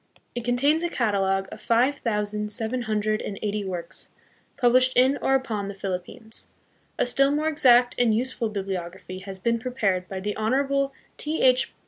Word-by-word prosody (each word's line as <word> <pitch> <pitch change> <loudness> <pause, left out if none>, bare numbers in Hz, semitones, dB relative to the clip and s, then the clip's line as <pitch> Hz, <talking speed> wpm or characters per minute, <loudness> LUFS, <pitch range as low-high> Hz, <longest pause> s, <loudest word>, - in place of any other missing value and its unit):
It 240 - -4
contains 275 +7 +2
a 345 - -1
catalogue 195 - 0
of - - -9
five 250 +5 +2
thousand 210 -2 -2
seven 225 +4 -1
hundred 215 -1 0
and 200 - -5
eighty 210 0 -1
works, 180 -3 -6 0.5
published 255 0 +4
in 260 +3 +5
or 270 - +3
upon 220 -7 -2
the 200 - -6
Philippines. 195 +4 -5 0.5
A - - +2
still 275 +3 +3
more 300 +2 0
exact 250 -5 +5
and 240 -2 +4
useful 235 0 -1
bibliography 190 -2 -5
has 190 0 -8
been 230 +4 0
prepared 205 -7 -1
by 190 - -4
the 205 +2 -3
Honorable 275 +5 +1 0.3
T. 305 +2 -2
H. 255 0 +4
225 Hz, 165 wpm, -25 LUFS, 200-255 Hz, 0.5 s, in